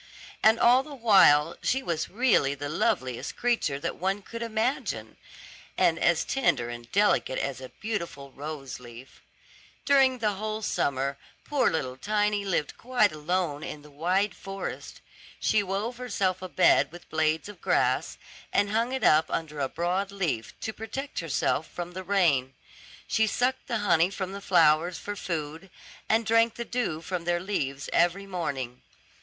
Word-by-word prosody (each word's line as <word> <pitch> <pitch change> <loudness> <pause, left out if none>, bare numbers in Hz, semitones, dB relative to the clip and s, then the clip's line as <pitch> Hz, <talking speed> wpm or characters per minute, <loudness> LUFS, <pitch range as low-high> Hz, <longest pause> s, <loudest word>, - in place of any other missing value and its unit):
And 220 +1 +5
all 245 +2 +6
the 290 +1 -10
while 180 - +5
she 265 +1 0
was 165 -6 -2
really 205 - +2
the 145 +1 -5
loveliest 130 -5 -1
creature 235 -13 0
that - - -3
one 195 +3 -1
could 230 +3 -8
imagine, 230 +3 -2 0.6
and - - +3
as - - +2
tender 190 - +1
and 120 0 -9
delicate 205 -9 +2
as 135 -2 -3
a 130 - -8
beautiful 170 -10 -5
rose 140 -2 -7
leaf. 120 +1 -13 0.6
During 270 -2 +4
the 215 -3 0
whole 215 +2 -4
summer 140 -5 -1 0.3
poor 280 -4 +2
little 130 -5 -3
Tiny 210 +5 0
lived 175 -7 -2
quite 245 -4 +2
alone 155 -1 -2
in 150 - -7
the 150 - -15
wide 180 +7 0
forest. 195 0 -7 0.4
She 215 - +2
wove 205 +5 -3
herself 195 -7 -1
a 185 - -6
bed 180 - +4
with 175 +1 -12
blades 160 +1 +1
of 205 - -11
grass, - - +1 0.3
and 205 0 +2
hung 230 +4 0
it 265 -3 -2
up 155 +1 +5
under 150 -2 -3
a 135 -1 0
broad 180 +4 -1
leaf, 170 - -3
to 220 - -3
protect 265 +6 -5
herself 160 -1 0
from 175 0 -6
the 185 +1 -6
rain. 165 -9 +2 0.5
She 220 0 +2
sucked 250 +4 0
the 235 - 0
honey 170 -2 +4
from 190 -1 -4
the 200 +1 -7
flowers 165 -2 +3
for 205 +5 -5
food, 165 0 -5 0.4
and 225 +1 +3
drank 230 +1 +3
the 235 - -5
dew 225 -12 -2
from 175 0 -4
their 175 0 +1
leaves 140 -8 -3
every 175 +3 +2
morning. 140 -10 -4
185 Hz, 160 wpm, -27 LUFS, 150-220 Hz, 0.6 s, all